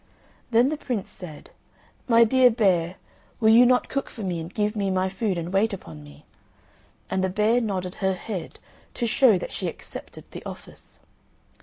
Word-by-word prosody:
Then 240 +2 +4
the 310 - -2
Prince 240 -9 -4
said, 160 -5 -10 0.6
"My 230 -1 +6
dear 255 +2 +5
bear, 185 -7 +1 0.4
will 220 -2 +4
you 240 +2 +7
not 250 0 +3
cook 275 0 -3
for 220 - -8
me, 180 -3 -2
and 165 +2 -7
give 210 +1 -1
me 200 -2 -1
my 190 0 0
food, 195 0 -2
and 170 +2 -4
wait 210 +3 +2
upon 80 - -9
me?" 70 -1 -15 0.9
and 190 - 0
the 190 - +1
bear 215 +5 +2
nodded 185 -5 -3
her 190 0 +2
head, 185 -2 -6 0.4
to 240 - -1
show 230 -2 +4
that - - -6
she - - -3
accepted - - -8
the - - -8
office. - - -11
205 Hz, 180 wpm, -25 LUFS, 185-230 Hz, 0.9 s, you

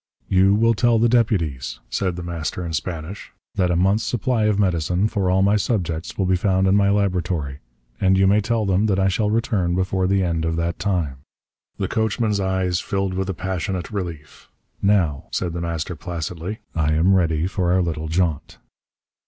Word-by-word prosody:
"You 95 +1 +4
will 115 +2 +4
tell 120 +2 +3
the 115 +2 +4
deputies," 95 - 0
said 90 -3 -1
The 90 - -6
Master 85 +1 -4
in 85 - -5
Spanish, 80 +3 -5 0.2
"that 90 -2 +1
a 90 - +1
month's 95 +5 +2
supply 120 -1 0
of 105 -2 +2
medicine 90 0 +1
for 100 -4 -1
all 95 +1 +3
my 100 +2 +4
subjects 85 -7 -2
will 95 - +1
be 95 0 +2
found 95 +1 +1
in 95 - +4
my 100 -1 +4
laboratory. 90 -8 -1 0.4
And 95 0 +3
you 95 - +4
may 100 +2 +4
tell 115 +1 0
them 100 +2 +2
that 100 -3 +1
I 95 0 +3
shall 105 +3 0
return 105 -6 0
before 95 0 0
the 95 0 +2
end 85 -2 -1
of 80 0 0
that 85 +1 -2
time." 85 -9 -1 0.6
The - - -1
coachman's 110 -1 0
eyes 95 -2 0
filled 95 -1 -2
with 95 +1 -2
a 95 - -2
passionate 95 +1 -3
relief. 85 -7 -6 0.3
"Now," 90 -9 +2
said 85 -2 -2
The 85 - -4
Master 85 0 -3
placidly, 85 +4 -5
"I 75 -2 +1
am 85 +5 +3
ready 85 -3 +2
for 90 -1 0
our 90 0 +3
little 80 -2 -3
jaunt." 80 -3 -1
95 Hz, 190 wpm, -22 LUFS, 85-100 Hz, 0.6 s, You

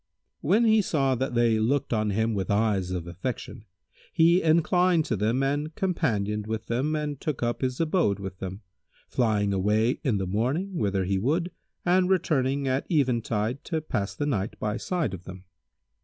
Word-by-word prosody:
When 210 +10 +3
he 220 -1 +5
saw 135 -8 +1
that 130 0 -2
they 115 -2 +3
looked 125 +4 0
on 110 -1 +1
him 110 +3 0
with 100 -1 -2
eyes 100 -3 +1
of 90 -2 -3
affection, 100 +5 -6 0.5
he 170 +2 +4
inclined 170 +1 +3
to 115 - -1
them 110 +6 +1
and 145 +3 -1
companioned 105 - -1
with 110 0 -3
them 130 +7 -1
and 150 -2 -3
took 150 -6 -3
up 120 0 -1
his 130 -1 -1
abode 160 - +2
with 95 -1 -7
them, 95 +2 -6 0.5
flying 105 -4 +1
away 105 +6 +1
in 120 -7 +1
the 95 - -1
morning 130 - -1
whither 100 - 0
he 95 +1 0
would 165 - 0 0.3
and 180 +1 +3
returning 140 -7 +1
at 130 +1 0
eventide 120 - 0
to 160 - -1
pass 105 -10 -3
the 145 - -2
night 105 -8 -2
by 105 0 -2
side 155 - -2
of 90 -1 -8
them. 95 -1 -9
120 Hz, 175 wpm, -26 LUFS, 105-155 Hz, 0.5 s, he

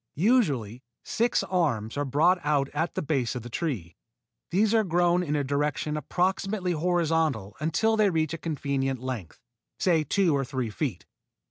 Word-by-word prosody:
Usually 145 - +1 0.2
six 235 +1 +1
arms 140 - 0
are 145 0 -1
brought 160 +7 +3
out 145 -2 +1
at 160 +2 -2
the - - -2
base 135 -5 -1
of 125 - -5
the 120 - -9
tree. 115 - -3 0.5
These 205 +4 +2
are 220 -1 +4
grown 175 -1 +2
in 150 -4 -1
a 145 - +1
direction 145 +2 -1
approximately 185 +5 -1
horizontal 160 - 0
until 190 +9 +1
they 215 -2 +4
reach 160 -3 0
a 165 - -4
convenient 140 -4 -2
length, 125 -8 -6 0.4
say 165 -4 +2
two 170 +1 +2
to - - 0
three 130 -3 -3
feet. - - -3
155 Hz, 160 wpm, -27 LUFS, 135-180 Hz, 0.5 s, are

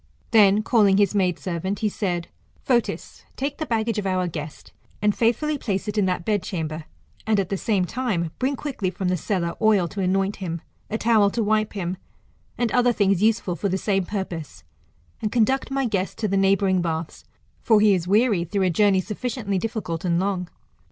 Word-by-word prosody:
Then, 210 -1 +5
calling 210 -4 +4
his 205 0 +3
maid 185 -4 +1
servant, 190 +2 -3
he 215 - +2
said, 180 -4 -2 0.4
Fotis, 240 -3 -1
take 280 +3 -3
the 310 - -3
baggage 225 -1 0
of 195 - -3
our 185 -1 0
guest, 150 -2 -7 0.3
and 210 0 +2
faithfully 285 +6 +1
place 200 -4 -2
it 210 - -3
in 205 -2 +2
that 180 -2 -2
bedchan(iber, 165 -7 -2 0.4
and 215 -2 +3
at 190 - -1
the 195 - -1
same 195 -1 0
time, 195 -8 -2
bring 265 +2 0
quickly 260 -10 -3
from 185 0 -3
the 180 - +2
cellar 175 -1 -2
oil 210 -5 +4
to 200 - -4
anoint 195 +2 0
him, 170 -4 -4 0.3
a 220 - -1
towel 220 -3 +4
to 230 +3 -1
wipe 215 0 +1
him, 185 -2 -3 0.6
and 240 -2 0
other 245 -1 +4
things 200 -4 +2
useful 210 -5 +2
for 200 - -2
the 190 - 0
^ame 195 -2 0
purpose, 180 -7 -5 0.6
and 215 - -1
conduct 255 +4 +1
my 270 0 0
guest 195 -5 -2
to 220 - -1
the 195 - 0
neighbouring 195 -1 +3
baths 160 -1 -4 0.2
| - - -38
for 220 -2 +4
he 210 -1 +5
is 180 -2 -1
weary 210 -2 +3
through 190 +3 -1
a 185 - +2
journey 195 +1 +3
sufficiently 215 -1 -3
difficult 190 -6 -4
and 170 -2 +1
long. 185 -2 -1
200 Hz, 195 wpm, -23 LUFS, 180-220 Hz, 0.6 s, Then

